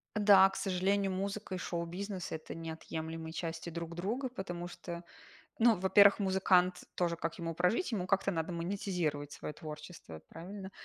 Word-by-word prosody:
Да, 200 -2 +8
к - - -9
сожалению, 195 +1 +1
музыка 195 +1 -3
и - - -3
шоу-бизнес- 180 +3 -4
это 160 -1 -5
неотъемлемые 160 0 -5
части 165 0 -4
друг 170 0 -5
друга, 230 +9 -2
потому 175 -7 -5
что, 175 -1 -7 0.6
ну, 225 -3 +6
во-первых, 200 +2 +7
музыкант 185 -2 +3
тоже, 170 -1 +1
как 165 0 -3
ему 165 -1 -3
прожить? 180 - +1
Ему 185 -5 -1
как-то 195 0 +2
надо 165 0 -2
монетизировать 170 -5 -2
свое 150 - -6
творчество, 150 - -9
правильно? 190 +3 -8
180 Hz, 150 wpm, -33 LUFS, 165-195 Hz, 0.6 s, Да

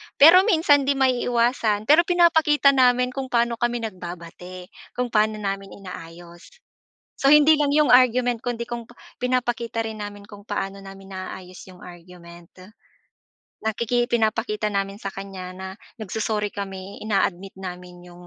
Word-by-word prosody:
Pero 355 +7 +7
minsan 290 -8 +3
hindi 280 - +2
maiiwasan, 240 -4 +1
pero 310 +9 +4
pinapakita 320 -5 +4
namin 250 -1 +3
kung 265 0 -5
paano 235 -1 0
kami 240 -1 -1
nagbabati, 180 -2 -9 0.2
kung 250 -1 -2
paano 215 0 +2
namin 195 -1 -5
inaayos. 175 -2 -11 0.7
So, 275 - +3
hindi 300 +1 +7
lang 290 - +2
yong 300 -3 +4
argument 245 -1 +4
kundi 240 -1 -4
kung 235 -1 -7
pa 240 - -18 0.2
pinapakita 240 -2 -1
rin 220 -1 -6
namin 205 0 -8
kung 205 -1 -13
paano 195 0 -4
namin 195 0 -12
naaayos 185 -1 -8
yong 180 -1 -14
argument. 175 -1 -14 1.2
Nakiki 235 +2 0
ipinapakita 220 -2 0
namin 200 0 -3
sa 200 - -4
kanya 190 -2 -8
na 190 0 -7 0.3
nag-so-sorry 210 +1 -2
kami, 195 -1 -7
ina-admit 195 -3 -1
namin 180 -1 -9
'yong, 175 0 -14
215 Hz, 140 wpm, -23 LUFS, 190-245 Hz, 1.2 s, Pero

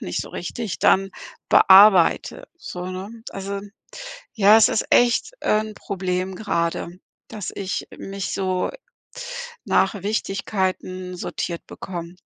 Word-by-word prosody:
nicht - - -3
so - - -11
richtig 225 -7 -5
dann 195 0 +3 0.4
bearbeite, 195 - +6
so, 180 - -7
ne? 185 +2 -6 0.2
Also, 200 0 -5 0.7
ja, 210 -1 +6
es 225 - +5
ist - - 0
echt, 245 - +3
äh, 215 - +2
'n 215 0 -6
Problem 185 -1 -3
gerade, 170 -5 -2 0.4
dass 210 -4 -6
ich 195 -1 -4
mich 195 0 -5
so 185 -1 -1 1.0
nach 200 -4 +1
Wichtigkeiten 190 -3 -2
sortiert 170 -1 -5
bekomme. 175 -2 -7
195 Hz, 115 wpm, -22 LUFS, 185-210 Hz, 1.0 s, bearbeite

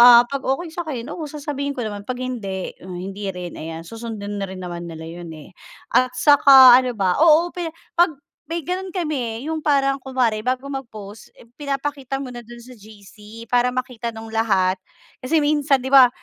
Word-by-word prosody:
ah, 240 0 +9
pag 275 +1 -3
okey 320 +6 -1
sa'kin, 305 -8 -5
oo, 330 - -5
sasabihin 285 -1 -4
ko 245 - -3
naman, 205 -2 -6
pag 255 - -2
hindi 205 -7 -4
o - - -11
hindi 195 +2 -5
rin 180 -1 -7
ayan, 160 +1 -7
susundin 215 -1 -6
na 195 - -2
rin 190 0 -8
naman 175 -1 -6
nila 160 -1 -8
'yun, 170 +1 -9
eh. 155 - -13 0.4
At 255 0 +2
saka 275 -3 +8
ano 255 -1 -1
ba, 185 -3 +1
oo, 335 +2 +5
pe 350 -2 -4 0.3
pag 345 -1 +4 0.4
may 335 -1 -3
gano'n 370 +2 -3
kami 295 - -2
eh, - - -5
'yung 320 -1 -2
parang 275 -2 +2
kunwari 255 -5 0
bago 255 +3 -2
mag-post, 220 -6 -8 0.3
pinapakita 275 -1 -3
muna 250 -3 -7
do'n 240 +1 -12
sa 255 - -13
GC 210 +1 -13
para 245 +1 +3
makita 250 -2 -4
nung 225 0 -9
lahat. 195 -5 +2 0.4
Kasi 270 +5 0
minsan 290 -2 +2
'di 265 - -4
ba, 265 -2 +9
250 Hz, 185 wpm, -21 LUFS, 210-280 Hz, 0.4 s, ah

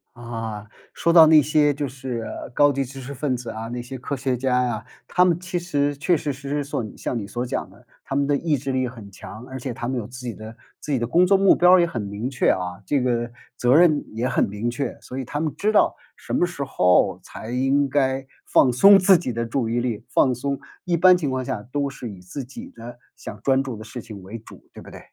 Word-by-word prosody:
啊， 115 -3 -6 0.3
说 170 - +1
到 165 -2 +9
那 155 -1 +7
些 150 0 +3
就 145 0 -3
是， 130 -2 -5
呃， - - -7
高 145 +3 +3
级 135 +1 0
知 135 +1 -9
识 135 +2 -7
分 135 -1 -1
子 120 -1 -7
啊、 110 +1 -6
那 120 +1 -4
些 130 +2 -8
科 135 +3 -4
学 130 0 -1
家 125 0 +1
呀， 120 -1 -2 0.2
他 180 - +3
们 175 -2 +2
其 180 0 -3
实 145 -5 -1
确 170 +5 +1
确 145 -1 -3
实 140 +1 -9
实 145 0 -1
所 140 -3 -3
像 125 - -3
你 105 -3 -5
所 120 +4 -3
讲 - - -3
的， - - -20 0.2
他 135 - -5
们 140 0 +2
的 145 - +2
意 155 0 0
志 135 +1 -4
力 130 -1 0
很 115 -5 -10
强。 110 +4 -10
而 130 0 -7
且 130 +1 -4
他 120 - -5
们 130 +1 -2
有 110 -4 -4
自 130 +2 -10
己 120 - -3
的 110 +1 -10 0.2
自 - - -6
己 135 - +2
的 120 - -1
工 170 +9 +4
作 195 +1 +5
目 195 0 +5
标 180 +1 +5
儿 185 - +7
也 170 - +4
很 165 -9 -4
明 100 +4 -4
确 135 - +1
啊， 90 0 -1
这 140 +4 +1
个 120 -1 -1 0.2
责 125 +1 +3
任 155 -3 +5
也 115 +3 -1
很 130 - +1
明 105 +4 -3
确， 120 +2 -4
所 130 - -9
以 135 - -2
他 145 - -4
们 155 -2 -1
知 210 +7 0
道 215 - +3 0.2
什 - - -8
么 - - +3
时 175 -5 -5
候 90 -7 +2
才 110 - -9
应 135 +3 +2
该 135 -1 0 0.2
放 125 -3 +4
松 195 +11 +8
自 190 0 +6
己 165 -7 -4
的 115 0 -2
注 115 0 -1
意 120 +1 0
力， 120 -3 -3
放 130 - +3
松。 140 +3 -3 0.3
一 175 -2 +1
般 185 +2 +7
情 155 -5 -2
况 130 -1 -2
下 130 -5 -3
都 145 0 0
是 130 -3 -8
以 100 -3 -10
自 90 +10 -7
己 235 - -10
的 120 +1 -10 0.2
想 - - -9
专 135 -1 +3
注 130 -4 -6
的 110 - -9
事 120 +3 -8
情 105 -3 -10
为 105 +5 -8
主， 110 - -16
对 - - -11
不 - - -12
对？ - - -11
130 Hz, 280 characters per minute, -23 LUFS, 120-145 Hz, 0.3 s, 到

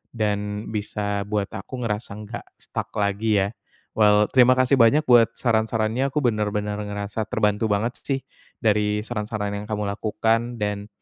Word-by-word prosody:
dan 105 -1 -2
bisa 105 -1 -2
buat 105 -1 -1
aku 125 -2 -6
ngerasa 105 -1 -3
nggak 115 +3 -7
stuck - - -6
lagi 105 +1 +1
ya. 100 - 0 0.5
Well, 105 -1 +5
terima 130 0 +6
kasih 130 +1 +3
banyak 120 +7 +5
buat 120 -2 +5
saran-sarannya 110 +2 +1
aku 150 -1 -1
benar-benar 105 -2 0
ngerasa 105 +1 -4
terbantu 105 0 +1
banget 110 +4 -1
sih 135 -1 -1 0.4
dari 105 -1 +2
saran-saran 105 -2 -3
yang 100 +1 -5
kamu 105 -1 -1
lakukan 115 +3 0
dan, 105 0 -2
105 Hz, 145 wpm, -24 LUFS, 105-115 Hz, 0.5 s, terima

